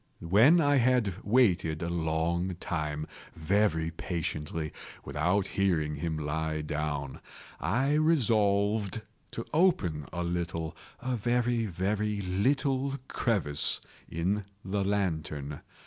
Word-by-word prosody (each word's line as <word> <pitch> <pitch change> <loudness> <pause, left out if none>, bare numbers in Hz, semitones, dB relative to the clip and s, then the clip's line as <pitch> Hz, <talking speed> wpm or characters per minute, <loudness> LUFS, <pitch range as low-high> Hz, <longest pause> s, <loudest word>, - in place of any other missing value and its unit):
When 115 - +6
I 145 -2 +4
had 125 -5 +3
waited 90 -9 +3
a - - -1
long 85 +2 0
time, 75 -3 -3 0.3
very 80 -1 +1
patiently, 80 -2 -3 0.3
without 85 +8 +1
hearing 80 -7 0
him 80 +1 -2
lie 80 +1 -2
down, 75 -2 -3 0.4
I 135 +6 +1
resolved 110 - +2 0.3
to 115 - -5
open 105 - +2
a 90 0 -2
little—a 85 +8 -3
very, 120 0 +1
very 105 +3 -1
little 130 +8 +1
crevice 90 - 0 0.3
in 95 +5 -1 0.2
the 100 +1 0
lantern. 80 -8 -2
95 Hz, 100 wpm, -29 LUFS, 80-110 Hz, 0.4 s, When